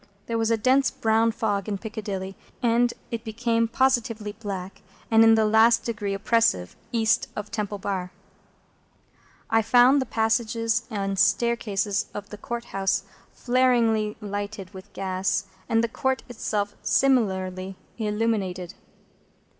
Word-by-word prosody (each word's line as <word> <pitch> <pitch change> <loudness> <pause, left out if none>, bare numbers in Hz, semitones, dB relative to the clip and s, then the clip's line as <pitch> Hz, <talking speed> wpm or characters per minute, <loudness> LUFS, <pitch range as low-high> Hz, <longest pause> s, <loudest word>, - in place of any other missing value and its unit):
There 230 -1 -2
was 225 0 +1
a 230 - +2
dense 260 +4 +3
brown 225 +1 +2
fog 205 -3 -2
in 200 - -1
Piccadilly, 200 -3 -5 0.3
and 240 +1 +3 0.2
it 230 -1 -4
became 230 0 0
positively 235 -3 0
black 195 -3 -7 0.3
and 225 0 +7
in 225 0 +7
the 220 -1 +3
last 225 +2 +5
degree 210 -4 -3
oppressive 195 - +1 0.2
East 230 0 +2
of 210 0 -6
Temple 210 -2 -3
Bar. 190 -2 -3 1.4
I 225 0 +4
found 245 +5 +5
the 260 - -3
passages 225 +1 0
and 195 -3 -2
staircases 205 -1 +1
of 205 0 -6
the 210 - -7
Court 235 +2 -5
House 195 0 0 0.3
flaringly 235 -4 +2
lighted 205 -1 -5
with 190 +2 -11
gas, 190 0 -1 0.2
and 225 0 +3
the - - +2
Court 265 +3 -1
itself 210 -4 -2
similarly 190 -7 +1 0.2
illuminated. 210 -4 -1
220 Hz, 130 wpm, -25 LUFS, 200-230 Hz, 1.4 s, and